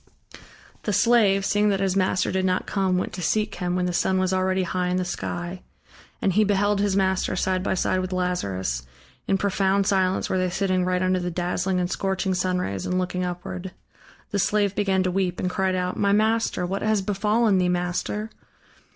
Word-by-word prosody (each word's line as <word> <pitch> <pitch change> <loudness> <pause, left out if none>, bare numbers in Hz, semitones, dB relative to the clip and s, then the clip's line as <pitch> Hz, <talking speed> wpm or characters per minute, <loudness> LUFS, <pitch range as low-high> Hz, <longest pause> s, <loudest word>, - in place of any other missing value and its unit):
The 210 - -2
slave, 205 -4 +4
seeing 205 +1 +2
that 195 -1 +1
his 190 -1 0
master 185 -1 +1
did 190 0 0
not 185 0 0
come, 190 -2 0
went 180 - -2
to 180 - -5
seek 210 +6 0
him, 180 -1 -2
when 180 0 0
the 180 - -1
sun 190 +2 +1
was 185 0 +1
already 185 0 +1
high 180 0 -1
in 180 0 0
the 185 - -1
sky. 175 +1 -4 0.6
And 190 - +2
he 215 +3 +4
beheld 205 0 +2
his 200 -2 +1
master 190 -1 +1
side 185 0 0
by 190 - 0
side 185 0 +1
with 185 0 -3
Lazarus: 100 - -1 0.5
in 195 - +2
profound 195 0 +1
silence 190 -1 +1
were 185 - 0
they 185 0 +1
sitting 185 0 0
right 180 0 0
under 185 0 +2
the 180 0 -2
dazzling 180 +2 -1
and 180 - 0
scorching 190 0 -1
sunrays 180 - -1
and 180 - 0
looking 180 0 -1
upward. 180 +1 -5 0.6
The 200 - 0
slave 205 0 +1
began 195 -2 +1
to 185 - 0
weep 180 -2 -1
and 180 - -1
cried 190 0 0
out: 180 0 -2
"My 200 -1 +2
master, 220 -3 +1
what 195 +3 -3
has 215 -2 +1
befallen 210 +1 +2
thee, 180 -1 +2
master?" 180 +5 -2
185 Hz, 200 wpm, -24 LUFS, 180-195 Hz, 0.6 s, slave